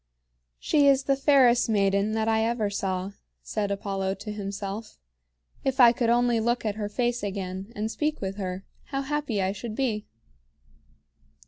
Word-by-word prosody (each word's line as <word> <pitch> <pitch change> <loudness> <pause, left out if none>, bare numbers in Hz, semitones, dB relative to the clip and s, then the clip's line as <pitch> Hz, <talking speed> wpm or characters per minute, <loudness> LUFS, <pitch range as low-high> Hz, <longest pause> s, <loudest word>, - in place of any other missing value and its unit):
"She 285 - +3
is 275 -1 +4
the 275 0 +2
fairest 265 -4 +4
maiden 200 0 +2
that 220 0 0
I 220 0 +2
ever 225 -3 0
saw," 190 -1 -2 0.3
said 210 -2 -2
Apollo 195 -1 -2
to 205 +2 -7
himself. 200 +1 -5 0.7
"If 265 0 -1
I 240 -2 +9
could 235 -1 0
only 240 -1 +3
look 235 +1 0
at 210 - 0
her 205 -1 -4
face 240 +2 -1
again 195 0 -4
and 215 +1 -2
speak 305 +3 -1
with 195 0 -4
her, 185 -1 -4 0.2
how 275 -1 -3
happy 270 -8 -1
I 190 - +1
should 215 +2 -6
be." 220 -5 -1
215 Hz, 160 wpm, -26 LUFS, 200-245 Hz, 0.7 s, I